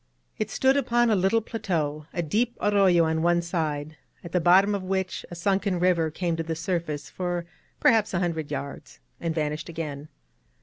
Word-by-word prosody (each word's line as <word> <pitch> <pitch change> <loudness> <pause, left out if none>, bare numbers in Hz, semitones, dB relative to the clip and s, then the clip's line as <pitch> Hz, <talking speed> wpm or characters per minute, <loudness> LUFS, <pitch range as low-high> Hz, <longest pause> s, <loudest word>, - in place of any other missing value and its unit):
It - - -1
stood 265 +1 +3
upon 240 -3 +2
a - - +4
little 195 +4 +2
plateau, 160 -10 -3
a 175 - -2
deep 230 +10 0
arroyo 195 -4 +4
on 160 0 0
one 170 +1 +2
side, 155 -3 -3 0.3
at 170 - -8
the 180 - +2
bottom 190 +5 +5
of 200 - -1
which 190 0 -2
a 175 - -7
sunken 190 +1 0
river 170 -3 +2
came 170 +2 -2
to - - -1
the 165 0 -3
surface 165 -4 -3
for 175 -2 -3 0.3
perhaps 220 -2 +4
a - - +2
hundred 165 -4 -2
yards, 140 - -6 0.2
and 165 -1 -2
vanished 155 +1 -2
again. 155 -3 -5
175 Hz, 180 wpm, -26 LUFS, 160-195 Hz, 0.3 s, bottom